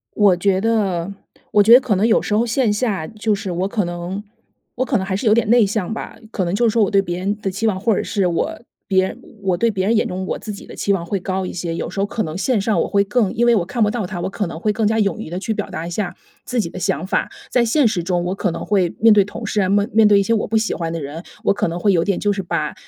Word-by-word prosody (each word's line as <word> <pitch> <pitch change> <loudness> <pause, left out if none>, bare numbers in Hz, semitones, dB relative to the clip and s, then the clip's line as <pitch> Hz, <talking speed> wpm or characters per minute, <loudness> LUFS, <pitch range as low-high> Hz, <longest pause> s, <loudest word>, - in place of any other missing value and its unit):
我 200 -4 +4
觉 190 +1 +1
得 200 -5 0 0.4
我 205 - +6
觉 220 +3 +5
得 250 - +9
可 230 -5 0
能 200 +4 +2
有 230 - +4
时 210 - -2
候 220 +3 +3
线 235 -1 +1
下， 205 -7 -1
就 215 +2 -1
是 195 -1 -4
我 180 +3 -1
可 210 -1 -1
能 175 +3 -5 0.5
我 255 - +1
可 260 -1 0
能 190 - -1
还 190 -1 -1
是 215 - -4
有 215 - +6
点 230 -2 +1
内 235 0 +5
向 205 -1 -2
吧。 - - -7
可 195 - -1
能 175 +1 -2
就 235 +3 +3
是 - - +1
说 230 0 +3
我 - - -2
对 200 -2 +4
别 175 -2 -4
人 200 +3 -1
的 195 - -2
期 200 +4 -2
望， 200 -4 +1
或 215 +3 +1
者 - - 0
是 195 -3 0
我 300 - -1 0.3
别 190 -3 +3
人 225 - -8 0.2
我 190 -2 +1
对 230 +6 +2
别 190 -3 -1
人 230 +2 +3
眼 - - +1
中 185 +1 -4
我 - - -3
自 215 - -6
己 200 - -10
的 - - -11
期 200 - 0
望 175 -3 -2
会 195 +2 -2
高 190 0 -2
一 - - -5
些。 170 -1 -4
有 - - -3
时 195 - -4
候 200 - +1
可 220 - -2
能 155 -2 -5
线 220 +3 +1
上 210 +2 +1
我 - - -3
会 200 0 +2
更 210 -1 +1
因 240 - +1
为 240 - +5
我 185 - +1
看 230 +6 -2
不 210 - +3
到 220 -3 -2
他， 180 -1 -5
我 - - -2
可 200 +1 -3
能 165 -1 -6
会 210 +5 0
更 220 0 0
加 220 +1 +1
勇 210 0 +1
于 215 - -7
地 175 - -3
去 220 +3 -2
表 - - -4
达 165 - -5
一 - - -5
下 180 +1 -3 0.3
自 245 -1 -1
己 195 - -2
的 185 - -8
想 180 -1 -1
法。 - - -1 0.2
在 245 - +3
现 255 +4 +3
实 200 -6 0
中 175 0 -1
我 180 +2 -1
可 195 -1 -1
能 170 0 -5
会 190 -4 +1
面 225 0 +6
对 205 -2 +5
同 220 +3 -7
事 210 - 0
啊， 185 - +1
面 205 +2 +2
面 220 -1 +5
对 205 -1 +6
一 - - +3
些 230 +4 +1
我 215 - 0
不 225 - 0
喜 220 +1 +1
欢 165 -1 -3
的 165 - -3
人， 145 +3 -6 0.2
我 - - +4
可 - - 0
能 170 +1 -3
会 200 +3 +2
有 170 -3 +2
点 200 -2 0
就 205 - +1
是 195 -1 -3
把 155 -4 -2
200 Hz, 345 characters per minute, -20 LUFS, 185-220 Hz, 0.5 s, 得